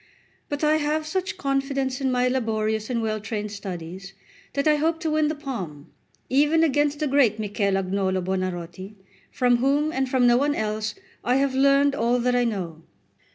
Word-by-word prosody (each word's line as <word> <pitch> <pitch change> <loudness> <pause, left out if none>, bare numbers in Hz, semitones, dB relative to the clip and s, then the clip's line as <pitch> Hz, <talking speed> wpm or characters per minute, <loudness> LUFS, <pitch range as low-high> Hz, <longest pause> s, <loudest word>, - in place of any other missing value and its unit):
But 290 +1 -3
I 305 +1 +4
have 305 +1 -1
such 375 +5 -3
confidence 275 -1 -1
in 265 -1 +1
my 250 0 +2
laborious 220 -4 -1
and 235 -2 -1
well 215 -1 -1
trained 210 -1 -4
studies, 190 -1 -7 0.4
that 280 +2 0
I 300 -1 +5
hope 325 +2 0
to 320 -3 -1
win 310 0 +2
the 310 - -1
palm, 190 - -6 0.4
even 300 +4 +3
against 290 -1 +2
the 305 - -1
great 265 -6 +3
Michel 205 -2 0
Agnolo 190 0 0
Buonarroti, 185 +1 -4 0.4
from 245 -2 +3
whom 285 +5 +1
and 265 0 -1
from 255 -1 +3
no 240 0 +5
one 290 +2 +1
else 215 0 -2 0.3
I 245 - +2
have 275 0 +2
learned 275 +1 +4
all 240 -1 +1
that 245 0 +1
I 245 0 +3
know. 180 -8 -3
250 Hz, 180 wpm, -24 LUFS, 210-285 Hz, 0.4 s, I